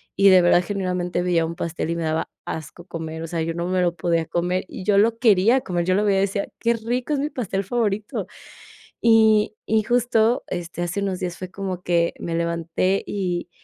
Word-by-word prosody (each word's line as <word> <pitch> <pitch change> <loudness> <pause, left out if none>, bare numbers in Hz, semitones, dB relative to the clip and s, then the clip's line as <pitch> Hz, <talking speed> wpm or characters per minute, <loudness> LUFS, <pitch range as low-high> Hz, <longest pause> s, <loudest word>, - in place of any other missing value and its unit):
y 200 0 +6
de 185 -1 +7
verdad 175 0 +4
genuinamente, 180 -2 -2
veía 175 -2 +2
un 165 +1 -5
pastel 165 -1 -3
y - - -1
me 170 - -2
daba 160 0 -1 0.2
asco 160 +2 -7
comer, 160 -2 -6
o - - -5
sea, 165 0 -2
yo 165 +1 -2
no 170 +1 -3
me 185 0 +1
lo 175 -1 +1
podía 170 -1 +1
comer, 175 +3 -1
y 190 - -7
yo 205 -2 +3
lo 225 +3 +3
quería 225 +2 +4
comer, 175 -5 -2
yo 185 +1 +2
lo 210 +2 +2
veía 195 -2 +3
y - - +2
decía: 200 0 -1
"Qué 235 0 +2
rico 240 +5 -3
es 285 - 0
mi 290 +2 -1
pastel 200 -8 -3
favorito", 210 -1 -1 0.7
y 220 -2 +4
y 220 0 +2
justo, 240 0 +2
este, 175 -1 -5
hace 175 +3 -2
unos 190 -2 -2
días 180 -1 -4
fue 185 0 -7
como 185 -2 -5
que 170 -1 +1
me 165 - -3
levanté 170 +3 0
y 180 -3 -2
185 Hz, 215 wpm, -23 LUFS, 170-210 Hz, 0.7 s, de